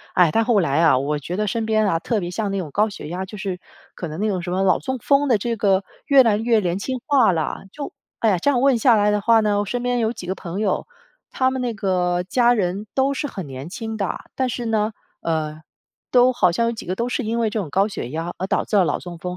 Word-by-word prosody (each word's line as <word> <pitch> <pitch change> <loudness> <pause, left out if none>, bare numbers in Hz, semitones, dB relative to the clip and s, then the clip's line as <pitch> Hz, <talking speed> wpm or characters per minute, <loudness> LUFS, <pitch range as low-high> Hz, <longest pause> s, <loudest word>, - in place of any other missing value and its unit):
哎， 175 -4 +5
但 225 - +3
后 225 -3 +3
来 145 -4 +1
啊， 160 -6 +5
我 145 +3 -1
觉 175 +6 -5
得 215 - 0
身 225 +1 -2
边 215 -1 +2
啊， 165 -5 +1
特 220 +5 -1
别 175 -2 -4
像 205 +2 -2
那 195 - -2
种 170 -6 -4
高 210 +6 +2
血 200 - -8
压， 185 +2 -4
就 210 +2 -10
是 190 -3 -4 0.3
可 175 - -6
能 155 +2 -7
那 215 - +1
种 190 -4 -1
什 175 - -5
么 185 +2 0
脑中风 260 +8 +2
的 235 -5 +4
这 235 +3 -2
个 195 -3 +2 0.2
越 275 -2 +7
来 215 -3 +3
越 225 0 +2
年轻化 235 - +1
了， 160 -3 -2
就 285 -1 -7 0.3
哎 225 - +3
呀， 190 - +3
这 175 - +1
样 245 -3 +1
问 270 -2 +4
下 235 +1 +5
来 210 -1 +3
的 210 - +1
话 225 +1 +4
呢， 205 -1 +1
我 205 - -1
身 245 +4 -3
边 245 0 0
有 225 0 0
几 180 - -9
个 185 - 0
朋 180 +2 -6
友， 200 -3 0 0.4
他 260 0 +1
们 260 -1 -3
那 245 -2 -1
个 180 -3 0
家 240 +6 +3
人 200 -1 -1
都 270 +1 +2
是 290 +2 -3
很 190 - -6
年 135 +2 -7
轻 220 +3 -5
的， 195 -3 -2 0.2
但 260 - 0
是 245 -1 -4
呢， 215 -1 0 0.3
呃， 155 -1 -2 0.5
都 250 0 +5
好 180 - +3
像 230 +7 +1
有 - - +1
几 225 - -7
个 185 - -2
都 235 +4 -2
是 255 - -2
因 230 +2 -1
为 225 -2 +1
这 215 +1 -2
种 180 - -4
高 195 +7 +2
血 125 - -5
压 165 +3 -4
而 190 - -3
导 - - +1
致 210 - 0
了 190 - +5
脑 175 +1 -4
210 Hz, 295 characters per minute, -22 LUFS, 180-235 Hz, 0.5 s, 越